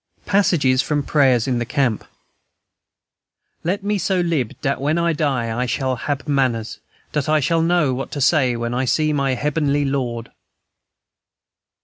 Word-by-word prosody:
Passages 150 -10 +3
from 145 0 -1
prayers 130 -5 +2
in 125 -2 0
the - - 0
camp: 125 -2 0 1.6
"Let 190 +4 -1
me 205 0 0
so 190 0 0
lib 165 -9 -1
dat 135 -1 -1
when 150 +4 +1
I 170 0 +1
die 130 -7 -1
I 125 +1 -1
shall 130 +1 -1
hab 145 +4 -4
manners, 130 -6 0 0.3
dat 150 +1 -1
I 155 0 +4
shall 165 +4 +1
know 165 -5 +2
what 135 +2 -4
to 145 - -3
say 130 -3 +3
when 120 0 -3
I 130 +2 0
see 155 +4 +1
my 135 -2 0
Heabenly 145 +1 0
Lord." 125 -4 -3
140 Hz, 155 wpm, -20 LUFS, 125-155 Hz, 1.6 s, I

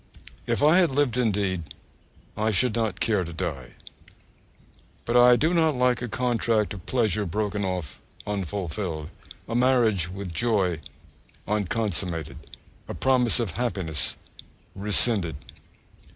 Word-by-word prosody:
If - - 0
I 155 +5 +6
had 175 - +4
lived 140 -3 +1
indeed, 100 -7 0 0.7
I 110 +1 0
should 110 +3 +2
not 110 -5 -1
care 105 -5 +1
to 85 - -7
die. 75 -8 -5 1.3
But 120 - -1
I 125 0 +7
do 160 +7 +1
not 160 -4 +2
like 125 -1 +1
a 120 - -3
contract 115 -3 0
of 95 -4 -11
pleasure 110 -5 +1
broken 105 +3 -2
off 90 -7 -4 0.3
unfulfilled, 90 -4 -4 0.4
a 115 - -5
marriage 120 -8 +2
with 95 -1 -7
joy 95 -6 +1 0.7
unconsummated, 95 -6 -1 0.5
a - - -6
promise 125 -3 +2
of 115 -6 -1
happiness 90 -9 0 0.6
rescinded. 100 -3 +2
105 Hz, 125 wpm, -25 LUFS, 90-120 Hz, 1.3 s, I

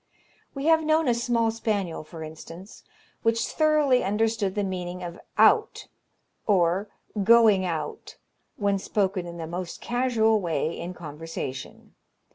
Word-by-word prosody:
We 275 +1 -4
have 320 0 +4
known 310 0 +2
a 245 - +4
small 235 -1 +1
spaniel, 205 -8 -2
for 160 +1 -9
instance, 165 +5 -11 0.4
which 230 0 +1
thoroughly 305 -5 +3
understood 210 0 0
the 205 - 0
meaning 180 -1 -4
of 175 0 -7 0.2
"out," 445 -1 +3 0.6
or 190 0 +2 0.4
"going 220 -3 +6
out," 165 -3 -5 0.4
when 200 -1 0
spoken 190 -2 -1
in 170 0 -8
the 165 - -5
most 175 +1 -5
casual 235 -3 +2
way 165 -2 -1
in 175 +2 -6
conversation. 150 -4 -7
200 Hz, 130 wpm, -26 LUFS, 170-230 Hz, 0.6 s, going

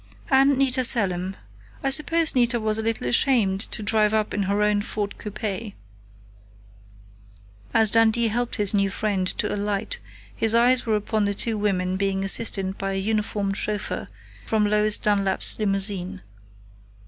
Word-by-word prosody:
"And 270 +1 +4
Nita 260 -1 +2
Selim. 190 -6 +1 0.5
I 270 - 0
suppose 325 +3 +2
Nita 240 -1 +1
was 215 0 +1
a - - 0
little 225 - -3
ashamed 195 - +2
to 215 - -4
drive 215 0 +1
up 215 -1 -1
in 205 - -1
her 200 +2 0
own 210 -1 +1
Ford 205 -1 -5
coupe." 210 0 -5 2.0
As 220 -2 +3
Dundee 225 0 +3
helped 240 +2 -2
his 205 -3 -1
new 200 -1 +1
friend 195 -2 -2
to 210 - -1
alight 205 +1 -3 0.4
his 225 0 +1
eyes 245 +1 +3
were 220 - +2
upon 210 0 -1
the 200 0 -1
two 225 +2 -1
women 190 -3 -1
being 195 0 -1
assisted 195 -1 +2
by 195 0 -3
a 195 - -2
uniformed 205 -1 -2
chauffeur 210 -1 -4 0.4
from 215 -1 +1
Lois 210 0 +3
Dunlap's 200 -1 +1
limousine. 195 - 0
210 Hz, 150 wpm, -23 LUFS, 195-225 Hz, 2.0 s, And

